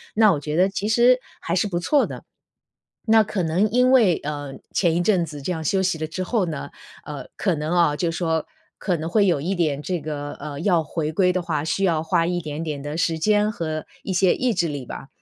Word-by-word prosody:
那 215 -1 +6
我 160 - 0
觉 150 +1 -4
得 185 +3 +4
其 200 +1 -3
实 240 +3 +5 0.2
还 170 - -2
是 185 +3 +1
不 175 -4 -2
错 280 - +2
的。 - - -8 0.8
那 220 0 +6
可 205 -2 -2
能 175 +6 +1
因 250 +3 +3
为， 225 -10 +5
呃， 145 -2 -5 0.2
前 170 -3 +2
一 175 - +2
阵 180 -3 +2
子 150 -3 -8
这 180 - -2
样 160 -2 -4
休 190 +5 +1
息 180 -3 0
了 155 - -2
之 175 +4 -4
后 205 -1 0
呢， 155 - -5 0.3
呃， - - -7
可 - - +1
能 150 0 -3
啊 165 -4 +3
就 170 +2 0
说， 165 -1 -1 0.3
可 180 -3 0
能 160 +1 -4
会 205 +3 +3
有 170 -7 +1
一 185 +5 -1
点 155 -5 0
这 180 +1 -2
个， 145 -1 -5
呃， 145 0 -6
要 175 -5 +2
回 155 0 -3
归 180 +3 +3
的 185 - 0
话， 160 -4 -2
需 175 +5 -1
要 165 -4 +2
花 165 +1 +1
一 175 +1 -1
点 155 -1 -5
点 150 -3 -4
的 145 +2 -5
时 165 -1 0
间 210 +4 +2
和 155 -5 -4 0.2
一 - - -4
些 185 0 +3
意 250 -3 0
志 170 - +1
力 140 -4 -5
吧， 135 - -8
170 Hz, 255 characters per minute, -23 LUFS, 155-195 Hz, 0.8 s, 那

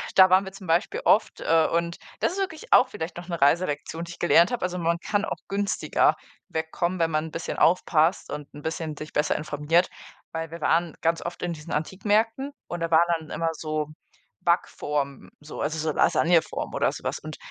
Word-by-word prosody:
da 190 -1 +8
waren 190 +1 +6
wir 190 - -7
zum 195 0 -12
Beispiel 165 +1 +1
oft, 215 - +3
äh, 160 -1 +3
und 170 0 0 0.2
das - - +1
ist 395 - -4
wirklich 330 -5 -2
auch 255 - +7
vielleicht 165 -8 -6
noch 175 0 -8
'ne 170 -2 -4
Reiselektion, 150 +1 +1
die 170 - -9
ich - - -15
gelernt 175 +1 +5
habe. 245 -6 -2
Also, 180 0 -2
man 170 0 +1
kann 205 +3 -1
auch - - -3
günstiger 200 0 +1 0.3
wegkommen, 165 +3 -2
wenn 165 -1 +2
man 155 0 0
'n 160 - -8
bisschen 165 - -4
aufpasst 165 -1 +3
und 150 -1 -6
'n 145 - -10
bisschen 160 -1 -4
sich 155 - -8
besser 150 - +1
informiert. 155 +3 +1 0.4
Weil 165 0 -4
wir 165 +1 -9
waren 165 +1 +1
ganz 165 0 +1
oft 170 - -6
in 175 -1 -1
diesen 155 +1 -8
Antikmärkten 215 - 0 0.2
und 175 - -5
da 165 0 -1
waren 165 +1 +5
dann 155 - -13
immer 165 0 -1
so 155 -1 -3 0.5
Backformen, 140 -2 -1
so 150 0 -8
also, 155 +3 -1
so 155 0 0
Lasagne-Form 165 -1 +2
oder - - +1
so - - -9
was. - - -2
Und - - -8
165 Hz, 205 wpm, -25 LUFS, 155-180 Hz, 0.5 s, da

